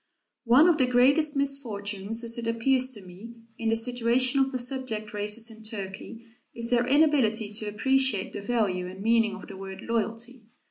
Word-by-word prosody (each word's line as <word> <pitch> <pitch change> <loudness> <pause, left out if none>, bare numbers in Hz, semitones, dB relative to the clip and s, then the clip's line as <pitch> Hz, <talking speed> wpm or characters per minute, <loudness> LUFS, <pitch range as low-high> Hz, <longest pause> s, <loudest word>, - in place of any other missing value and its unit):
One 255 +8 +6
of 340 -3 +3
the 260 - +3
greatest 280 +5 +3
misfortunes, 225 -6 -2
as 230 0 -2
it 230 - -5
appears 255 +3 +2
to 205 -3 -12
me, 200 +6 -12 0.2
in 225 - -1
the 225 - +2
situation 245 +3 +1
of 270 0 +2
the 260 - -2
subject 245 -4 -3
races 210 +3 0
in 220 - -16
Turkey, 215 +1 -7 0.3
is 235 +1 -5
their 245 0 +2
inability 255 -8 +2
to 215 0 -1
appreciate 260 -1 +1
the - - -6
value 200 -5 -1
and 185 +1 -10
meaning 225 -1 +2
of - - -11
the 195 - -10
word 190 0 -8
"loyalty." 230 +1 -4
230 Hz, 180 wpm, -26 LUFS, 210-255 Hz, 0.3 s, One